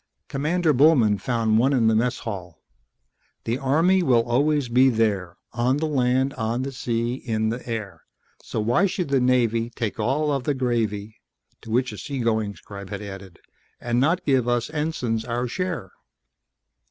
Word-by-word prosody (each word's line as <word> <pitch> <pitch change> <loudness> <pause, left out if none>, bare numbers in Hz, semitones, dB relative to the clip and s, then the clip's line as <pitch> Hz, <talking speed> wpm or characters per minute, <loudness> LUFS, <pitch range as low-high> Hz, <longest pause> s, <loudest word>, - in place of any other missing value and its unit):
Commander 155 +3 +1
Bullman 125 -8 +4
found 115 -3 +1
one 135 +4 +3
in 120 -4 +2
the 110 - +4
mess 120 +3 +1
hall: 90 -7 -7 0.8
The 120 +3 -2
Army 165 +8 +3
will 125 -8 +3
always 145 +3 +2
be 130 +3 +4
there, 100 -7 0 0.2
On 120 +3 +1
the 160 - -1
land, 130 -2 +1
on 120 0 -2
the 135 - -4
sea, 120 -2 -2
in 110 -4 -2
the 115 +3 -4
air. 110 -4 -5 0.4
So - - -4
why 120 - +2
should 180 -4 -3
the 135 -1 +3
Navy 120 -2 +2
Take 115 -2 -4
all 145 +7 +1
of 135 -3 -1
the 145 +2 0
gravy... 110 -4 -2 0.4
to 115 - -12
which 125 +2 +1
a 105 - -8
seagoing 110 -5 -1
scribe 100 -2 -10
had 100 0 -5
added: 95 -3 -9 0.4
_And 120 0 0
not 165 +7 +1
give 130 -4 +2
us 120 +3 0
ensigns 150 -8 -2
our 120 +1 -2
share? 165 - -4
120 Hz, 165 wpm, -24 LUFS, 110-135 Hz, 0.8 s, Bullman